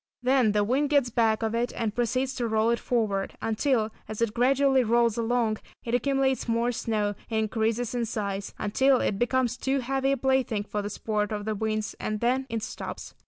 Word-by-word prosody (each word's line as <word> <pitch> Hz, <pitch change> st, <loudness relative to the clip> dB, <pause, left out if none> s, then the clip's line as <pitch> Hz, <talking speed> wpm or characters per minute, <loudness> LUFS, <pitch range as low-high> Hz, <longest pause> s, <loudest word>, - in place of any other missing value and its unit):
Then 250 Hz, -4 st, +3 dB
the 210 Hz, -1 st, +3 dB
wind 265 Hz, +7 st, +1 dB
gets 280 Hz, -5 st, +3 dB
back 225 Hz, -1 st, +2 dB
of 220 Hz, 0 st, -1 dB
it, 235 Hz, +1 st, 0 dB
and 225 Hz, -3 st, -1 dB
proceeds 255 Hz, +3 st, 0 dB
to 240 Hz, -3 st, -2 dB
roll 220 Hz, +1 st, +2 dB
it 235 Hz, -, +1 dB
forward, 210 Hz, -5 st, -1 dB
until, 225 Hz, 0 st, 0 dB, 0.2 s
as 215 Hz, -, -5 dB
it 230 Hz, -2 st, 0 dB
gradually 265 Hz, +2 st, +3 dB
rolls 235 Hz, -1 st, +3 dB
along 230 Hz, -2 st, 0 dB, 0.2 s
it 235 Hz, -, -4 dB
accumulates 265 Hz, +1 st, +1 dB
more 230 Hz, +1 st, +1 dB
snow, 215 Hz, -3 st, -1 dB, 0.2 s
and 220 Hz, -1 st, +1 dB
increases 225 Hz, +3 st, -1 dB
in 240 Hz, -1 st, 0 dB
size, 200 Hz, -3 st, -3 dB
until 260 Hz, +5 st, +3 dB
it 195 Hz, -, -1 dB
becomes 250 Hz, 0 st, +1 dB
too 270 Hz, +1 st, 0 dB
heavy 270 Hz, +2 st, 0 dB
a -, -, -1 dB
plaything 260 Hz, -5 st, +1 dB
for 210 Hz, 0 st, -3 dB
the 205 Hz, -, -4 dB
sport 210 Hz, 0 st, -2 dB
of 205 Hz, -1 st, -3 dB
the 215 Hz, -, -1 dB
winds, 215 Hz, 0 st, -2 dB
and 215 Hz, 0 st, -2 dB
then 255 Hz, +3 st, +1 dB
it 225 Hz, -2 st, -3 dB
stops. -, -, -6 dB
230 Hz, 200 wpm, -27 LUFS, 215-255 Hz, 0.2 s, Then